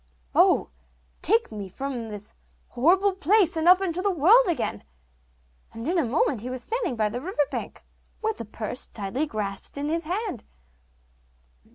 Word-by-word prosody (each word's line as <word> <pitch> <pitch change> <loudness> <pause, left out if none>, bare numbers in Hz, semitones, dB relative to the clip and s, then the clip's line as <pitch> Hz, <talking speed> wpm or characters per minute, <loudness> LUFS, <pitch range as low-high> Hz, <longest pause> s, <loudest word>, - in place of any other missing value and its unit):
'Oh, - - +4 0.5
take 450 - +3
me 200 -3 -7
out 275 +1 -2
of 230 -2 -5
this 210 -1 -6 0.4
horrible 370 +10 +3
place, 380 0 +3
and 320 +1 0
up 365 +2 +7
into 360 -1 -1
the 405 - +1
world 390 - +5
again; 250 - -2 0.9
'and 230 +4 -6
in 350 +1 +2
a - - +2
moment 250 -1 +1
he 250 - -5
was 255 -1 -5
standing 450 - -2
by 215 -2 +1
the 240 +4 -4
river 310 -2 0
bank, - - -6 0.4
with 440 0 -2
the 230 - -5
purse 215 +4 -4
tightly 220 +9 -3
grasped 205 -1 -5
in 290 +1 -2
his 330 +1 -1
hand. 370 - -3
300 Hz, 170 wpm, -26 LUFS, 230-370 Hz, 0.9 s, up